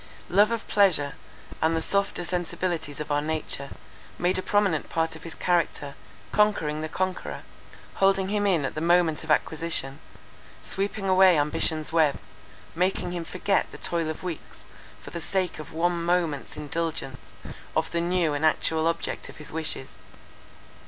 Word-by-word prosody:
Love 205 +4 +5
of 230 -1 -3
pleasure, 170 -9 +3 0.5
and 160 +1 +3
the - - +2
softer 200 +1 +1
sensibilities 170 -4 -2
of 150 - -4
our 145 0 +2
nature, 150 -2 -3 0.5
made 180 +1 +1
a - - +1
prominent 200 -6 +1
part 165 0 0
of 160 - -10
his 165 0 -9
character, 165 -5 0 0.4
conquering 165 -8 +2
the 155 - -3
conqueror; 185 +2 -3 0.5
holding 195 -1 +3
him 205 0 +1
in 170 -7 +2
at - - -3
the 155 - -4
moment 170 -2 +3
of 160 - -10
acquisition; 155 -3 +1 0.6
sweeping 200 +1 -1
away 185 -2 +6
ambition's 155 +2 0
web; 155 -4 +4 0.6
making 180 +1 0
him 175 -1 -3
forget 190 +4 0
the - - -9
toil 165 -2 -1
of 155 - -6
weeks, 175 -4 -7 0.4
for - - -11
the 170 - -5
sake 185 -1 -1
of 155 - -8
one 170 +1 0
moment's 170 -4 0
indulgence 150 -3 -3 0.5
of 160 0 0
the 170 - 0
new 170 -3 +1
and 145 +1 -2
actual 160 0 +2
object 165 0 -2
of - - -12
his 150 - -6
wishes. 160 -4 -2
165 Hz, 160 wpm, -26 LUFS, 155-185 Hz, 0.6 s, away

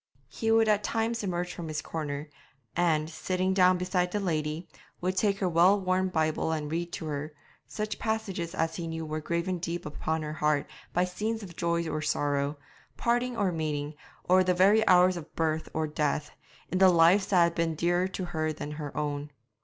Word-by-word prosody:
He 225 - -2
would 225 0 +5
at 210 -1 +3
times 230 0 -1
emerge 180 -2 -2
from 170 - -6
his 155 -1 -3
corner, 150 -2 -4 0.5
and, 160 -3 +2
sitting 185 +4 -1
down 185 -1 +5
beside 180 0 0
the 210 - -1
lady, 155 -3 -2 0.3
would 185 +1 -1
take 200 0 +2
her 195 - 0
well 180 +4 +5
worn 185 0 +1
Bible 160 -2 0
and 150 -2 -3
read 170 +1 -2
to - - -4
her 150 0 -4 0.3
such 215 0 -4
passages 215 -7 -2
as 165 0 -1
he 170 -2 -4
knew 160 0 -4
were 155 0 -3
graven 170 +3 -1
deep 170 0 -4
upon 155 +1 -2
her 150 0 -4
heart 150 -1 +1 0.3
by 180 +1 +2
scenes 215 +5 -3
of 175 -4 -10
joy 170 0 0
or 155 - -2
sorrow, 145 -1 0 0.4
parting 240 +1 0
or 195 -3 +1
meeting, 150 -2 -2 0.3
or 185 +1 +4
the 180 0 +2
very 200 +4 +5
hours 180 0 +6
of 160 -2 -10
birth 160 -1 -1
or 160 0 -1
death, 150 0 -1 0.4
in 185 - 0
the 190 -1 +8
lives 175 +3 +5
that 180 -3 +5
had 170 0 +2
been 165 -1 0
dearer 175 +3 +1
to 190 -1 -4
her 155 -2 -1
than 150 -1 -6
her 150 -1 -6
own. 145 -1 -2
170 Hz, 195 wpm, -29 LUFS, 155-185 Hz, 0.5 s, the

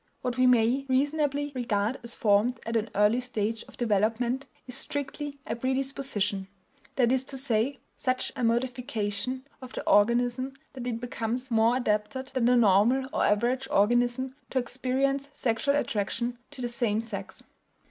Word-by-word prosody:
What 250 -1 -1
we 255 +1 +4
may 250 +3 +3
reasonably 290 +1 +1
regard 235 -2 0
as 235 0 -6
formed 215 +4 +2
at 230 +1 -3
an 225 0 0
early 210 +4 +4
stage 225 -3 -2
of - - -16
development 235 +4 +1 0.2
is 250 - -6
strictly 285 0 -4
a - - -2
predisposition; 260 -6 -1 0.5
that 245 -3 +3
is 260 0 +2
to 270 - -5
say, 255 +1 0 0.2
such 255 -1 0
a 255 - -3
modification 240 0 -1 0.2
of 255 -1 -10
the - - -6
organism 240 +5 +3 0.2
that 250 -2 -6
it 230 -2 -2
becomes 245 +1 -3
more 225 +1 +4
adapted 240 +3 -1
than 260 -3 0
the 250 +1 +5
normal 230 +5 +4
or - - +1
average 240 +5 +2
organism 240 +5 +2
to - - -3
experience 265 +2 0
sexual 255 +4 +1
attraction 235 -1 -1
to 285 -3 -9
the - - 0
same 235 -3 0
sex. 205 -4 -6
245 Hz, 155 wpm, -28 LUFS, 225-260 Hz, 0.5 s, the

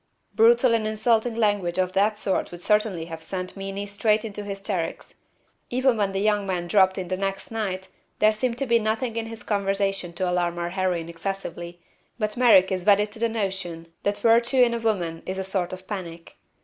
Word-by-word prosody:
Brutal 235 +2 +5
and 220 -2 +1
insulting 220 +2 +1
language 205 -6 +1
of 185 0 0
that 210 +2 +2
sort 195 -3 -1
would 175 0 -9
certainly 210 -6 +1
have 165 -1 -8
sent 185 +2 -5
Meenie 195 0 -5
straight 210 +2 +1
into 210 -1 -6
hysterics. 195 -4 -4 0.6
Even 255 0 +2
when 205 -3 0
the 195 - -2
young 210 -1 +1
man 180 -2 -1
dropped 190 0 +4
in 185 -2 -3
the 185 - -1
next 195 +2 -4
night 190 -4 -3 0.3
there 215 0 +5
seemed 235 +2 -2
to 275 - -1
be 235 -2 +3
nothing 225 +2 -1
in 225 -1 -2
his 225 0 -9
conversation 195 -3 -1
to 185 +2 -2
alarm 175 -1 0
our 170 0 -2
heroine 180 -3 -1
excessively, 175 0 -6 0.4
but 215 -2 -1
Merrick 210 -7 +6
is 185 -1 -1
wedded 205 +1 +4
to 220 - -12
the 230 0 +1
notion 190 -6 -4
that 205 0 0
virtue 235 +3 +4
in 235 -1 +2
a 235 - -1
woman 180 -8 -1
is 185 - -3
a 190 - -2
sort 190 -2 -2
of 185 0 -8
panic. 170 -5 -7
195 Hz, 200 wpm, -25 LUFS, 185-220 Hz, 0.6 s, Merrick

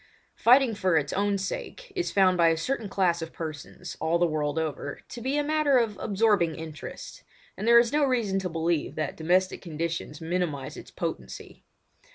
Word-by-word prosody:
Fighting 250 0 +5
for 185 -5 +2
its 145 -2 -1
own 200 +1 +1
sake - - -6
is 360 -2 -1
found 190 -2 +4
by 170 -1 +4
a 165 0 +3
certain 225 +4 -2
class 180 -4 +1
of 165 0 -5
persons, 155 -3 -7
all 160 +2 +2
the 175 - +3
world 155 -2 -1
over, 150 -3 -3
to 240 - -8
be 265 +4 -1
a 295 - +2
matter 300 -2 +3
of 225 -4 +1
absorbing 200 -6 +2
interest, 160 -2 -8 0.3
and 210 - -4
there 235 0 +8
is 235 +1 +4
no 300 0 +3
reason 235 -8 +1
to 185 -1 -3
believe 165 -1 -1
that 155 -3 -2
domestic 180 +4 +1
conditions 165 -2 -4
minimise 165 -5 -2
its - - -10
potency. - - -6
185 Hz, 185 wpm, -27 LUFS, 160-230 Hz, 0.3 s, there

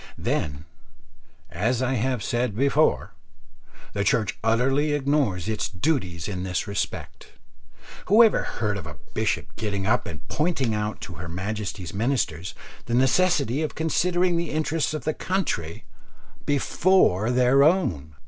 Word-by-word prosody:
Then, 70 +1 -2 0.9
as 115 +7 0
I 130 0 0
said 120 0 -1
before, 140 - +2 0.8
the 100 - 0
Church 110 +1 +1
utterly 135 +6 +2
ignores 140 - 0
its 110 +1 -1
duties 90 - -1
in 95 -3 -4
this 90 0 -2
respect. 100 0 -5 0.7
Who 220 +4 +7
ever 225 - +4
heard 105 -3 -2
of 90 - -9
a 75 -3 -9 0.2
bishop - - -1
getting 100 -3 -2
up 110 - +1
and 80 -5 -9
pointing 145 -7 0
out 105 0 -3
to 90 - -7
her 85 - -6
Majesty's 95 0 -4
Ministers 100 - -1 0.3
the 120 - 0
necessity 140 0 +2
of 155 - -3
considering 175 +2 +1
the 170 -1 -2
interests 155 0 -1
of 150 - -5
the 155 - 0
country 120 - -2 0.6
before 145 - +3
their 125 +2 +4
own? 95 - +2
120 Hz, 135 wpm, -25 LUFS, 95-150 Hz, 0.9 s, Who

